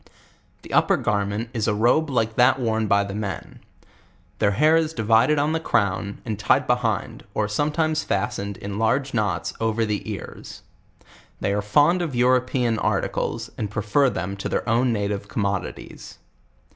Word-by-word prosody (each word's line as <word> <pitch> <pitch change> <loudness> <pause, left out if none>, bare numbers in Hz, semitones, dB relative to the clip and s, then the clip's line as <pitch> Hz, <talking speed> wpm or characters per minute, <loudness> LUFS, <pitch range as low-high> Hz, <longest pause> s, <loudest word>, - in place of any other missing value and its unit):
The - - -10
up - - +4
>er - - +4
garment 105 +3 -1
is 110 -3 -1
a 105 - +1
robe 125 +8 +2
like 115 -4 0
that 125 +2 +4
worn 110 -3 0
by 100 0 +3
the 100 0 -6
men. 100 -3 -5 0.8
Their 100 - +3
hair 155 +1 +5
is 160 -1 +1
divided 115 +6 +3
on 145 +2 +1
the 160 - 0
crown, 100 -8 -1
and 110 -3 -4
tied 110 - +3
behitul, 120 -5 -1
or 105 - +1
some 145 +9 0
times 155 0 0
fastened 100 0 -2
in 100 +1 -5
large 130 +5 +1
knots 100 -7 -1
over 115 0 0
the 105 -1 -3
ears. - - -9 0.8
They 100 - 0
are 105 - 0
fund 145 - +3
of 155 -7 -3
European 125 -2 +2
articles, - - -2
and 105 - -2
prefer 110 +6 +2
them 100 -4 -4
to 100 - -4
their - - -2
own 120 +2 +2
native 100 -2 -2
commodities. 100 -2 -4
110 Hz, 170 wpm, -23 LUFS, 100-130 Hz, 0.8 s, hair